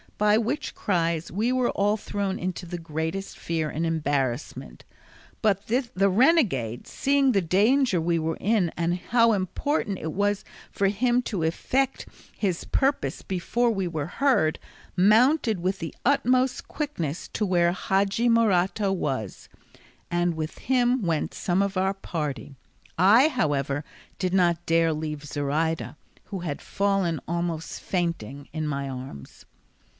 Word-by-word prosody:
by 210 0 +4
which 245 +7 -2
cries 170 -4 -1
we 220 +7 0
were 255 -1 +1
all 205 +2 +1
thrown 200 -2 -3
into 180 0 -4
the 175 +1 -5
greatest 160 +4 -4
fear 160 -2 -2
and 160 +3 -2
embarrassment; 145 -5 -2 0.6
but 200 -2 +2
the 230 -5 +1
renegade 190 - +2
seeing 275 -1 +2
the 200 -5 +2
danger 205 - +3
we 170 +1 +1
were 160 0 -2
in 205 -5 +1
and 170 +1 0
how 230 +5 +3
important 200 - -1
it 160 - -4
was 205 +1 0 0.3
for 200 - +1
him 240 +5 +1
to 195 -8 -3
effect 260 +11 0 0.3
his 185 -5 -1
purpose 275 +1 0
before 230 +6 0
we 195 -4 -1
were 155 -4 -3
heard, 180 - +2 0.4
mounted 220 - +4
with 185 +3 -1
the 165 - -5
utmost 255 -1 +2
quickness 175 - -4
to - - -3
where 175 -2 +3
Hadji 195 +5 +1
Morato 205 -3 +2
was, 130 - -4 0.6
and 175 -1 +1
with 155 0 -5
him 250 0 +2
went 165 -3 -1
some 180 +1 0
of 200 -1 -2
our 190 +1 +1
party; 150 -7 -5 0.4
I, 210 - +6
however, 145 - -1 0.4
did 185 -1 -1
not 175 -2 +2
dare 165 0 +3
to - - +1
leave 150 -1 -5
Zoraida, 150 +3 -1 0.3
who 195 - -5
had 160 -5 -4
fallen 195 -5 0
almost 170 -1 -3
fainting 145 - -3
in 155 0 -3
my 140 -1 -2
arms. 130 - -9
185 Hz, 140 wpm, -26 LUFS, 160-220 Hz, 0.6 s, I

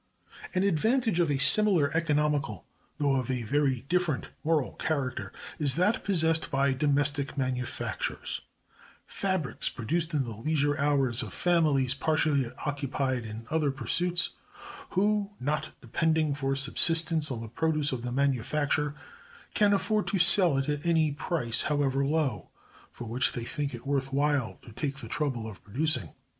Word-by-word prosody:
An 185 - +2
advantage 220 - +2
of 170 -3 +3
a 145 - +1
similar 160 0 +4
economical, 150 - 0 0.3
though 140 -2 +2
of 130 -1 -2
a 125 -2 -1
very 135 +1 +1
different 175 -4 0
moral 155 -5 +1
character, 140 -7 -2 0.3
is 140 -4 +2
that 185 +6 +2
possessed 165 -4 +1
by 140 -1 +2
domestic 145 0 +1
manufactures; 130 -2 -3 0.6
fabrics 185 - -2
produced 160 +7 -2
in 140 - +2
the 115 -3 -6
leisure 145 +5 0
hours 135 -4 +2
of - - -7
families 150 -7 +2
partially 145 -3 +1 0.2
occupied 135 -4 -1
in 110 +1 -8
other 155 -2 +2
pursuits, 170 +7 +1 0.6
who, 205 +1 +1
not 150 +3 -1
depending 155 +4 +1
for 135 -1 -1
subsistence 160 +2 +2
on 125 -4 -3
the 115 - -6
produce 150 +5 0
of 130 -3 -3
the 125 0 -4
manufacture, 140 +3 0 0.6
can 205 -1 +4
afford 210 +1 +1
to 200 - 0
sell 175 -4 +4
it 135 - -1
at 145 -1 -2
any 160 -3 +2
price, 140 -4 -1
however 140 -2 +1
low, 140 - -1 0.4
for - - -9
which 125 +4 0
they 120 -2 -4
think 140 0 -3
it 120 - -11
worth 135 -1 -1
while 140 -8 0
to - - -12
take 140 +5 -3
the 140 - -8
trouble 130 -7 -2
of 105 -3 -10
producing. 130 - -1
145 Hz, 150 wpm, -28 LUFS, 130-160 Hz, 0.6 s, similar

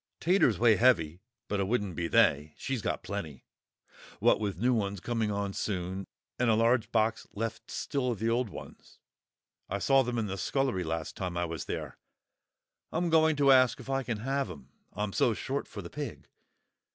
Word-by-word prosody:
"Taters 170 - +3
weigh 115 -1 +5
heavy, 90 -8 +3 0.3
but 105 - -1
it 95 - 0
wouldn't 105 -5 -1
be 85 -1 -1
they; 75 -1 +3
she's 135 -4 -3
got - - -2
plenty, 80 -10 -6 0.7
what - - +4
with 100 -4 -2
new 125 +6 +2
ones 100 -4 -1
coming 115 +2 -1
on 100 -1 -2
soon, 95 -1 -3 0.3
and 125 -1 +2
a 110 - +5
large 115 0 +2
box 110 0 +1
left 115 +2 -4
still 135 -3 -2
of 120 - -1
the 110 +3 -1
old 120 0 +1
ones; - - -11 0.7
I 100 - -1
saw 135 +6 +4
them 125 -1 -2
in 115 - 0
the 95 -1 -4
scullery 130 -2 0
last 80 -1 -4
time 90 -2 -4
I 85 - 0
was 80 -3 -5
there. - - -5 0.9
I'm 170 +1 0
going 160 -1 +5
to 140 -1 +5
ask 130 -2 +5
if 135 - -7
I 135 0 +1
can 115 -5 -4
have 135 -1 -1
'em, 70 -7 -10 0.2
I'm 105 -1 -3
so - - +2
short - - -3
for - - -8
the - - -8
pig. - - -6
110 Hz, 190 wpm, -30 LUFS, 95-125 Hz, 0.9 s, weigh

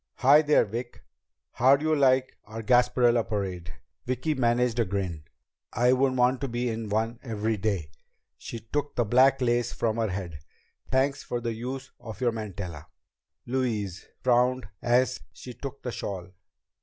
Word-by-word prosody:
"Hi 140 +4 +6
there, 150 -4 +4
Vic! 120 +4 -6 0.5
How 130 +3 +5
do 145 +3 -4
you 155 - +3
like 130 -2 +3
our 110 +1 -7
Gasparilla 120 0 +4
Parade?" 95 -6 -4 0.4
Vicki 130 +5 0
managed 120 -2 +1
a 115 - +3
grin. 90 -6 -3 0.5
"I 120 +3 +4
wouldn't 130 0 +2
want 125 +1 +3
to 140 - -1
be 120 0 -2
in 110 -1 -4
one 115 +3 -1
every 110 -3 -2
day." 95 -7 -2 0.4
She 115 - -7
took 145 +7 -3
the 120 - +1
black 130 +4 +4
lace 120 -1 +1
from 115 -1 -1
her 110 -2 0
head. 90 -5 -5 0.5
"Thanks 135 +1 +1
for 120 - -3
the 115 -1 -3
use 130 +4 -6
of 110 -2 -9
your 125 -2 +2
mantilla." 100 -8 -6 0.6
Louise 110 -7 -2 0.2
frowned 125 -1 +2
as 125 +2 +2
she 125 - -9
took 140 +2 -8
the 125 - -3
shawl. 95 -5 -5
120 Hz, 160 wpm, -27 LUFS, 105-130 Hz, 0.6 s, Hi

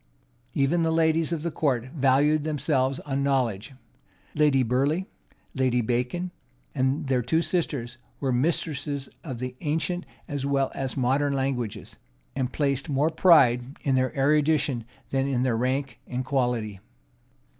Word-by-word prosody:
Even 145 +5 +2
the 165 - +2
ladies 160 0 +2
of 160 -2 -2
the 170 - -1
court 130 -6 0
valued 145 +2 +3
themselves 140 -3 0
on 140 -1 -2
knowledge: 130 -3 0 0.6
Lady 145 -3 +3
Burleigh, 140 +9 +1 0.5
Lady 130 -2 +1
Bacon, 125 +10 -1 0.4
and 135 +4 0
their 130 -2 +1
two 160 +8 +1
sisters, 140 -10 -2 0.2
were 135 -2 0
mistresses 140 0 -1
of 130 -7 -5
the 125 +1 -5
ancient 160 +4 -1 0.2
as 145 -5 -3
well 140 -1 +1
as 135 +1 -3
modern 135 +3 +1
languages; 125 -6 -3 0.4
and 130 -1 -1
placed 140 0 -1
more 145 +3 +2
pride 135 -7 +4
in 135 - +1
their 130 0 +2
erudition 145 -3 +2 0.3
than 135 0 +1
in 130 -3 0
their 125 -3 +1
rank 130 +2 -1
and 125 +1 -3
quality. 120 -7 -1
135 Hz, 140 wpm, -26 LUFS, 125-150 Hz, 0.6 s, pride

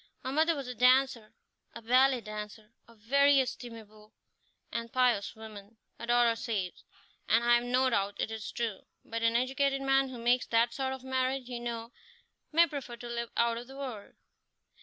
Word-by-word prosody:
Her 260 - -3
mother 320 +3 +2
was 275 -3 -5
a 250 - -4
dancer, 250 -3 +3 0.4
a - - -8
ballet 255 +2 +4
dancer, 215 0 -8
a 230 - -18
very 280 +6 +4
estimable 220 -4 -6 0.6
and 230 0 -4
pious 245 -5 +1
woman, 220 -1 -11 0.2
her 235 - -7
daughter 240 -1 +4
says, 210 -6 -2 0.6
and 230 +1 +4
I 240 0 +4
have 240 0 +3
no 255 +2 +2
doubt 200 -4 -1
it - - -2
is 220 -1 -6
true; 230 -5 -4 0.2
but 230 0 -4
an 230 0 +2
educated 270 +2 +1
man 270 0 +3
who 255 - -8
makes 240 +2 +1
that 230 +1 +2
sort 265 +1 -2
of 265 -1 -8
marriage, 260 0 -1
you 245 -1 -4
know, 235 -1 -5 0.6
may 335 +2 +6
prefer 280 -6 -6
to 240 +1 -9
live 235 -1 -4
out 235 0 +2
of 240 - -10
the 270 +1 -11
world." 250 -7 -7
240 Hz, 180 wpm, -30 LUFS, 230-260 Hz, 0.6 s, may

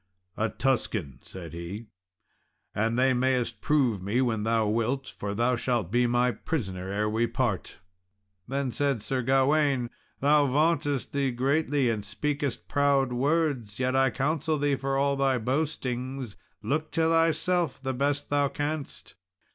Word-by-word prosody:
"A 110 +1 0
Tuscan," 105 - -1
said 85 -4 -9
he; 85 +7 -6 0.9
"and 115 +3 0
they 130 +1 +4
mayest 125 -3 0
prove 130 -10 +2
me 100 +6 0
when 115 -4 +1
thou 110 0 +1
wilt, 115 +5 -1
for 100 0 -4
thou 120 +3 +2
shalt 120 -6 -1
be 120 +1 +3
my 120 +1 +2
prisoner 95 - -4
ere 105 +2 0
we 110 +2 +1
part." 115 -4 -2 0.7
Then 135 0 -1
said 140 -5 0
Sir 130 +4 -1
Gawain, 135 0 +2 0.3
"Thou 145 +1 +4
vauntest 145 -1 +1
thee 140 -1 +1
greatly, 140 +2 +1
and 105 -2 -3
speakest 140 +5 -3
proud 140 -3 +2
words; 135 -5 0
yet 130 0 +1
I 135 0 +4
counsel 155 +4 0
thee, 145 -1 +1
for 135 0 -2
all 140 0 +2
thy 135 -1 +2
boastings, 130 -2 -2 0.3
look 155 +2 -1
to 165 - +1
thyself 165 +2 +2
the 130 0 -3
best 140 +3 -1
thou 145 -1 +3
canst." 145 +1 -4
130 Hz, 145 wpm, -27 LUFS, 115-145 Hz, 0.9 s, they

